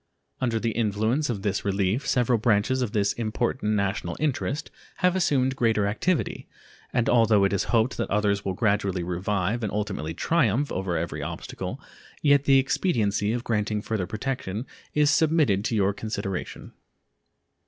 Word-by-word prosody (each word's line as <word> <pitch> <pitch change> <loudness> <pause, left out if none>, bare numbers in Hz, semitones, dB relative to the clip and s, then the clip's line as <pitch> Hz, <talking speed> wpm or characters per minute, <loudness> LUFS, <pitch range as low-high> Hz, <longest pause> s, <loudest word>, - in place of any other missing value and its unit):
Under 120 -3 0
the 115 0 -1
influence 110 +6 0
of 105 -5 -3
this 100 -2 -1
relief 100 +5 0
several 125 -2 +2
branches 110 +3 +2
of 120 -5 -1
this 100 -3 +1
important 110 -1 -1
national 100 0 -1
interest 150 +1 -2 0.2
have 180 0 +2
assumed 135 -7 +2
greater 110 -4 +2
activity, 150 - -1 0.4
and 120 -1 +1
although 115 -4 +4
it 100 - +2
is 100 - 0
hoped 115 +2 +1
that 115 - -2
others 100 -1 +1
will 95 - -2
gradually 100 -4 0
revive 95 +5 -1
and 110 -3 -2
ultimately 95 -7 -3
triumph 140 - +1
over 95 -2 -1
every 85 +1 -3
obstacle, - - -5 0.4
yet 140 -1 +4
the 135 -1 +6
expediency 110 - +1
of 120 +1 -2
granting 105 -2 0
further 105 -3 -2
protection 110 -1 -3 0.3
is 150 0 +4
submitted 155 - +3
to 115 - 0
your 100 -1 +2
consideration. 100 -3 -5
110 Hz, 155 wpm, -26 LUFS, 100-130 Hz, 0.4 s, the